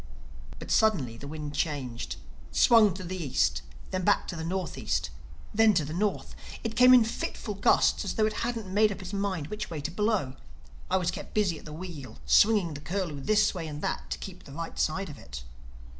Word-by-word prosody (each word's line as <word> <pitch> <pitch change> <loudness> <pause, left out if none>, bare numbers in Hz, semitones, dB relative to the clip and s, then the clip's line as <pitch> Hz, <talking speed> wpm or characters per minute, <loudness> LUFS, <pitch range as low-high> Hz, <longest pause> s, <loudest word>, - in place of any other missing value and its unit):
But - - -7
suddenly 175 - +2
the 140 +5 -9
wind 150 -1 -6
changed, 135 -6 -3 0.4
swung 220 -6 +5
to 185 - -6
the 180 0 -4
East, 135 - +1 0.3
then 185 0 -1
back 205 - +2
to 185 - -4
the 160 - -5
Northeast—then 165 - -1
to 160 -4 +2
the 155 - -6
North. 200 +3 -1 0.3
It 225 0 -3
came 250 +1 +7
in 245 - +7
fitful 220 -1 -4
gusts, 200 - +3
as - - -3
though 220 - +3
it 215 - 0
hadn't 230 -2 -2
made 210 +1 +4
up 195 -1 -6
its 180 +2 -7
mind 195 -7 -2
which 210 - -4
way 160 - -5
to 150 +3 -4
blow; 210 +1 +1
and 130 -1 -10 0.5
I 190 - +3
was 180 -1 0
kept - - -8
busy 190 -7 +1
at - - -16
the 155 - -8
wheel, 155 - -8
swinging 185 - +4
the 145 - -8
Curlew 165 -2 -3
this 215 +6 +3
way 170 -4 -5
and 150 -1 -7
that - - -3
to - - -2
keep 185 -1 -9
the 140 - -11
right 165 +2 -6
side 190 +4 0
of 145 -5 -10
it. - - -9
180 Hz, 210 wpm, -28 LUFS, 145-210 Hz, 0.5 s, came